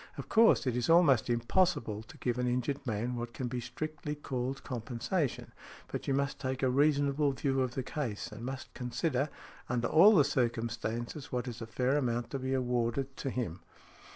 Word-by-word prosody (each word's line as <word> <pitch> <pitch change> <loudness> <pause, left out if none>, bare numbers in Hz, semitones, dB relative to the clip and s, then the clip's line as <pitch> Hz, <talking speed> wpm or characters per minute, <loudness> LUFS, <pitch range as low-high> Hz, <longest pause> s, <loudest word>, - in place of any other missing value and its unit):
Of - - -7
course, 225 -8 +5
it 125 -2 0
is 125 +2 -1
almost 155 -9 +5
impossible 120 - +1
to 110 - -14
give 125 0 -1
an 125 - +1
injured 130 +3 -1
man 115 +3 -1
what 120 0 -5
can 130 - -3
be 125 +1 -3
strictly 150 +5 -5
called 135 -2 -3
compensation, 125 - -2 0.4
but - - -5
you 135 - +2
must 140 0 -1
take 130 0 -3
a 130 - +3
reasonable 145 0 +3
view 135 0 0
of 130 -1 -1
the 130 - -1
case, 120 -6 -4
and 110 +2 -8
must 130 +1 -6
consider, 130 +3 -1 0.4
under 120 -1 +1
all 200 +7 +7
the 150 - +7
circumstances, 120 +1 -2
what 125 0 -2
is 120 -1 -6
a 115 - -5
fair 130 +5 +1
amount 120 -4 -1
to 135 - -2
be 130 +1 -1
awarded 125 +1 -1
to 135 - -3
|80| - - -4
him". 105 -9 -3
130 Hz, 190 wpm, -32 LUFS, 120-140 Hz, 0.4 s, all